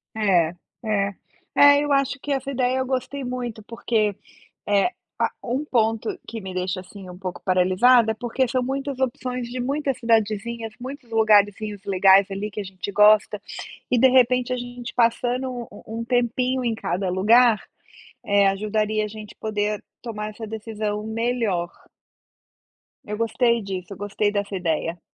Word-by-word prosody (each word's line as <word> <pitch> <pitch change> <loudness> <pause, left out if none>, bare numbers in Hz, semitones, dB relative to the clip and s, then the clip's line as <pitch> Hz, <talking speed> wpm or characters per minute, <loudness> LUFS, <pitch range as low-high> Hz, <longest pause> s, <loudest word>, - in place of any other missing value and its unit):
É 180 -6 +2 0.3
é 205 -2 0 0.4
é, 285 0 +7
eu 290 - -2
acho 275 0 +2
que 290 - -4
essa 270 0 -1
ideia 255 0 +1
eu 260 - 0
gostei 265 +1 -3
muito, 245 -3 -4
porque 215 -3 -1 0.5
é 205 - +3 0.3
ah, - - +1
um 260 +5 -1
ponto 225 -4 0
que 225 -1 -6
me 190 -1 -7
deixa, 185 +1 -2
assim, 185 0 -12
um 180 0 -10
pouco 185 -2 -6
paralisada 195 +6 +4
é - - -9
porque 245 +1 0
são 255 0 0
muitas 270 +1 -3
opções 250 -1 -2
de 250 +1 -5
muitas 275 0 -1
cidadezinhas, 225 0 0
muitos 260 -1 -8
lugarzinhos 210 -2 +2
legais 195 0 +5
ali 200 +2 -4
que 210 - -5
a - - -4
gente 190 +1 -6
gosta. 210 0 +5 0.5
E, 250 - +3
de 260 +2 +6
repente, 250 0 +3
a - - 0
gente 245 0 -7
passando 245 +2 +1 0.2
u - - -13 0.2
um - - -3
tempinho 250 +1 0
em 230 -2 0
cada 195 -3 -2
lugar, 220 +4 +4 0.6
eh, 200 -1 +4
ajudaria 215 +2 0
a - - -4
gente 215 -1 -10
poder 210 -1 -2 0.2
tomar 215 -3 -5
essa 220 +1 -8
decisão 215 -1 -4
melhor. 220 -6 -1 1.3
Eu 210 0 -5
gostei 235 +1 +1
disso, 190 -1 -6
eu - - -11
gostei 205 +1 -1
dessa 205 -1 -2
ideia. 165 -1 -1
220 Hz, 160 wpm, -23 LUFS, 205-250 Hz, 1.3 s, é